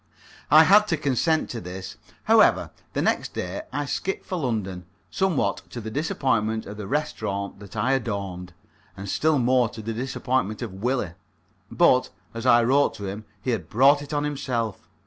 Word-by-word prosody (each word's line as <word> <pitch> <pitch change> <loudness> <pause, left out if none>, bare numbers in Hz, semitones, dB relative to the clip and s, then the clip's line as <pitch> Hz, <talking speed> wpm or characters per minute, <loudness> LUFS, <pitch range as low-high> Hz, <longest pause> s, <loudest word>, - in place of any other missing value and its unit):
I 155 +2 +8
had 210 +5 +6
to 165 - 0
consent 150 +3 +1
to 120 - -5
this. 95 +2 -7 0.3
However, - - +4 0.2
the - - 0
next - - 0
day 90 +2 -3
I 145 +2 -2
skipped 190 +7 -3
for 185 - -4
London, 105 - -3 0.2
somewhat 190 -6 +1
to 120 - -6
the 110 -1 -6
disappointment 115 -6 0
of 105 +1 -8
the 105 -2 -6
restaurant 105 -10 -3
that 100 -2 -12
I 130 - +1
adorned, 100 -8 -3 0.4
and 100 +1 -7
still 155 +9 +2
more 125 -1 +3
to 115 - -9
the 115 +1 -3
disappointment 125 -2 -2
of 110 -5 -6
Willie. 105 -2 -1 0.6
But, 130 -7 +4 0.2
as 115 +2 -4
I 120 -1 +6
wrote 135 +4 +3
to 100 - -7
him, 100 +3 -6 0.2
he 130 - 0
had 110 -6 -3
brought 140 +5 +5
it 145 - -9
on 145 -1 0
himself. 125 -7 -3
120 Hz, 175 wpm, -25 LUFS, 105-140 Hz, 0.6 s, I